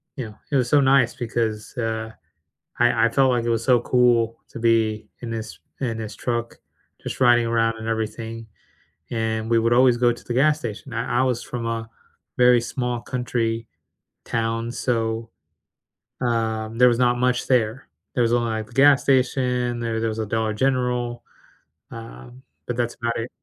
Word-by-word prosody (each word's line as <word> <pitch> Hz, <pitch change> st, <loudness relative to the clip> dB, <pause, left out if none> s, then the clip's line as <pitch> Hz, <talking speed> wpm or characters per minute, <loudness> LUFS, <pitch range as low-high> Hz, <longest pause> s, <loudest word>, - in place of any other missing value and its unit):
you 130 Hz, -5 st, -4 dB
know, 105 Hz, -, -12 dB, 0.2 s
it -, -, +1 dB
was 125 Hz, -3 st, +2 dB
so 145 Hz, -, +5 dB
nice 135 Hz, -2 st, +3 dB
because, 115 Hz, -1 st, -3 dB
uh, 110 Hz, -1 st, -2 dB, 0.7 s
I 120 Hz, -1 st, +4 dB
I -, -, +3 dB
felt, 135 Hz, +1 st, +3 dB
like, 120 Hz, -2 st, 0 dB
it 120 Hz, -, 0 dB
was 115 Hz, 0 st, 0 dB
so 125 Hz, -2 st, +4 dB
cool 120 Hz, -2 st, +2 dB
to -, -, -8 dB
be 110 Hz, -2 st, +1 dB
in 115 Hz, -, -5 dB
his 110 Hz, -1 st, -6 dB, 0.2 s
in 115 Hz, -4 st, -2 dB
his 110 Hz, -2 st, -6 dB
truck 120 Hz, -1 st, -3 dB, 0.5 s
just -, -, -6 dB
riding 120 Hz, -2 st, +5 dB
around 115 Hz, 0 st, +1 dB
and 110 Hz, 0 st, -6 dB
everything. 115 Hz, 0 st, -4 dB, 0.7 s
And 110 Hz, -1 st, -2 dB
we 115 Hz, -1 st, +4 dB
would 115 Hz, +1 st, +2 dB
always 125 Hz, -1 st, +5 dB
go 120 Hz, 0 st, +3 dB
to 120 Hz, -, -13 dB
the 120 Hz, -, -3 dB
gas 150 Hz, +4 st, +3 dB
station. 110 Hz, -6 st, -7 dB
I 115 Hz, +1 st, -1 dB
I -, -, +3 dB
was 125 Hz, -2 st, 0 dB
from 120 Hz, -1 st, -5 dB
a 115 Hz, -1 st, -3 dB, 0.5 s
very 125 Hz, -1 st, +5 dB
small 120 Hz, 0 st, -3 dB
country 115 Hz, -2 st, -2 dB, 0.6 s
town, 115 Hz, 0 st, -2 dB
so, 115 Hz, -2 st, -1 dB, 0.9 s
um, 115 Hz, -2 st, -1 dB
there 125 Hz, +1 st, +7 dB
was 120 Hz, 0 st, 0 dB
not 120 Hz, -1 st, +3 dB
much 125 Hz, 0 st, +1 dB
there. 120 Hz, -1 st, +1 dB, 0.3 s
There 125 Hz, -, +2 dB
was 115 Hz, -, +1 dB
only, 120 Hz, -1 st, +1 dB
like, 110 Hz, -1 st, -3 dB
the 115 Hz, -, -17 dB
gas 140 Hz, 0 st, +6 dB
station, 125 Hz, -2 st, +1 dB
there 115 Hz, -1 st, -2 dB
there 115 Hz, -, 0 dB
was 110 Hz, -, -4 dB
a 110 Hz, -, -1 dB
Dollar 110 Hz, +1 st, -1 dB
General, 125 Hz, 0 st, -1 dB, 0.7 s
um, 115 Hz, +2 st, -11 dB, 0.3 s
but 120 Hz, -, -3 dB
that's 120 Hz, -1 st, -1 dB
about 115 Hz, -1 st, -2 dB
it. 115 Hz, +2 st, -4 dB
115 Hz, 180 wpm, -23 LUFS, 115-125 Hz, 0.9 s, there